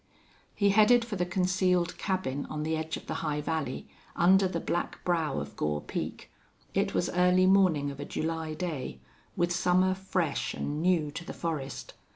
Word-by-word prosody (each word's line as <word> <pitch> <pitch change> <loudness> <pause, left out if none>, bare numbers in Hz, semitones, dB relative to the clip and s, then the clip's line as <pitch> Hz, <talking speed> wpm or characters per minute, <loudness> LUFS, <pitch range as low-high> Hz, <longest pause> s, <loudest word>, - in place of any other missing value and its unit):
He 200 -1 +3
headed 230 +3 +5
for 230 -3 -4
the 180 -2 -1
concealed 180 -1 +1
cabin 185 -9 -2
on 150 0 -4
the 160 +1 0
edge 160 0 -3
of - - -11
the - - -4
high 150 -2 -1
valley, 150 -4 -3 0.3
under 190 +2 +5
the 170 -2 -2
black 175 +1 -3
brow 165 -5 +1
of 70 0 -7
Gore 75 0 -1
Peak. - - -5 0.4
It - - 0
was - - +1
early 180 +1 +4
morning 185 -7 +4
of 140 - -10
a 145 - -4
July 160 -1 -3
day, 155 - -4 0.4
with 175 0 +1
summer 180 +1 +3
fresh 185 -5 -2
and 150 +2 -3
new 170 -4 +2
to 170 - -6
the - - -7
forest. 150 -5 -4
170 Hz, 180 wpm, -29 LUFS, 150-185 Hz, 0.4 s, headed